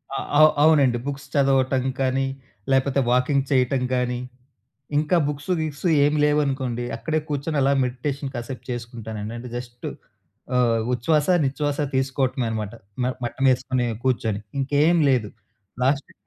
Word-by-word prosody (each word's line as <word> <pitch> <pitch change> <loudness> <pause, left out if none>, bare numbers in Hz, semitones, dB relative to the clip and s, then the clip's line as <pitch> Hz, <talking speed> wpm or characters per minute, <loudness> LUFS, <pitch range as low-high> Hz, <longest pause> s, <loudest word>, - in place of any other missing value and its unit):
ఆ! - - -1 0.2
అవు 155 0 +8
అవునండి. 140 -6 +5
బుక్స్ 140 0 -5
చదవటం 135 -2 +3 0.2
కానీ, 135 0 +1 0.5
లేపోతే 135 +1 +2
వాకింగ్ 135 +2 +2
చెయటం 130 -1 +2
కానీ, 125 -1 -1 0.8
ఇంకా 155 +4 +2
బుక్స్, 145 +4 -4
గిక్స్ 155 +2 -5 0.2
ఏం 145 - +2
లేవనుకోండి, 135 -5 0
అక్కడే 155 -1 -1
కూచ్చొని 145 +1 -2
అలా 140 +1 +3
మెడిటేషన్ 135 +2 -3
కాసేపు 120 +2 -6
చేసుకుంటానండి. 115 -2 -6
అంటే, 125 +1 -8
జస్ట్ 120 0 -8 0.7
ఆహ్, 120 -2 +3
ఉచ్ఛ్వాస, 145 +5 +1 0.2
నిచ్ఛ్వాస 145 +1 -1 0.2
తీసుకోవటమే 130 -1 0
అనమాట, 110 -1 -4 0.3
మ - - +1 0.2
మటమేసుకొని 130 0 +1 0.2
కూచ్చొని, 115 -5 0 0.2
ఇంకేం 145 +5 +3
లేదు 120 -6 +1 0.5
లాస్ట్‌కి 140 +1 0
130 Hz, 125 wpm, -23 LUFS, 125-145 Hz, 0.8 s, అవు